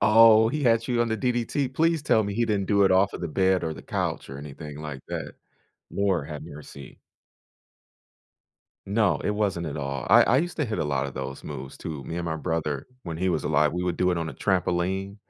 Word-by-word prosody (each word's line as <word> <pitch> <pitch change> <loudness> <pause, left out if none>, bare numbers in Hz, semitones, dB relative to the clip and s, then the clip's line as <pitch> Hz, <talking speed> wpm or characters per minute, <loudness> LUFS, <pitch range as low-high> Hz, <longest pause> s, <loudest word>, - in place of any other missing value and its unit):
Oh, 110 0 +7
he 150 +2 -2
had 115 -1 +3
you 120 -2 +1
on 120 - +2
the 110 - 0
DDT. 125 +3 0
Please 165 +1 +2
tell 110 -7 +3
me 100 0 -3
he 120 +1 +1
didn't 100 -3 0
do 100 0 +3
it - - +4
off 95 +1 +3
of - - -6
the 85 - -3
bed 95 +2 +2
or 80 - -2
the 70 - -11
couch - - -3
or 70 - -7
anything 75 +1 -8
like 75 -4 -6
that. - - -5 0.6
Lord, 95 -7 0
have 75 -1 -6
mercy. 75 -3 -11 1.9
No, 100 -7 +2
it - - +1
wasn't 100 -5 -1
at 75 - -4
all. 70 -3 -4
I - - +8
I 125 - +3
used 175 +4 -2
to 150 - +2
hit 110 -4 -3
a - - 0
lot 70 -1 -1
of 70 - -8
those 65 +1 -6
moves 70 -2 -7
too. 75 -4 -6
Me - - -6
and 85 - -3
my 80 -1 -2
brother- 75 -4 -2 0.2
when 80 -2 -5
he 95 +3 0
was 90 - 0
alive, 75 0 +2
we 90 +1 -2
would 90 -1 -1
do 90 0 +2
it - - -1
on 85 -1 -2
a - - -6
trampoline 95 +1 -1
90 Hz, 230 wpm, -26 LUFS, 75-110 Hz, 1.9 s, I